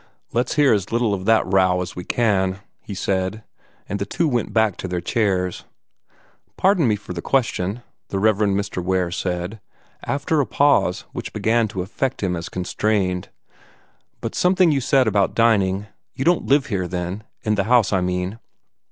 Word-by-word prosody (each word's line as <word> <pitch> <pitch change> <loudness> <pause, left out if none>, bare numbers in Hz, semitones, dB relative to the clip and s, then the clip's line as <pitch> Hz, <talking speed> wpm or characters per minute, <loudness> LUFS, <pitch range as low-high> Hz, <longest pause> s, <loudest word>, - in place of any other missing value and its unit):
"Let's 120 +2 0
hear 145 -5 +5
as 100 -2 -1
little 115 -2 +1
of 95 -1 -4
the 110 0 +4
row 95 -1 +3
as 90 -1 -5
we 90 - -5
can," 95 -4 +1 0.2
he 100 - -8
said, 95 +3 -2 0.4
and 100 - -3
the 100 - -1
two 165 +9 0
went 120 -5 -1
back 110 -4 +2
to - - -5
their 90 -1 -2
chairs. 95 -4 -1 0.9
"Pardon 185 -7 +3
me 110 - +3
for 105 -3 -8
the 85 - -5
question," 115 -3 -1 0.2
the 95 - -3
Rev. 105 +1 +3
Mr. 100 -3 0
Ware 90 -1 0
said, 90 +3 -3 0.4
after 145 +2 0
a 135 - -2
pause 140 -11 +2
which - - -6
began 115 0 +2
to 95 -3 -4
affect 130 +6 -3
him 90 -2 0
as 85 0 -5
constrained, 90 -1 -1 0.9
"but 115 - -4
something 180 -2 +3
you 140 -2 +1
said 130 +1 +3
about 100 -3 +1
dining 100 -4 +2 0.3
you 135 - -3
don't 175 0 +2
live 140 0 +4
here, 95 -6 -2
then? 90 +4 -4 0.2
In 105 - +1
the 100 -2 0
house, 120 -3 +3
I 95 - +2
mean?" 90 +4 -2
100 Hz, 180 wpm, -22 LUFS, 95-120 Hz, 0.9 s, hear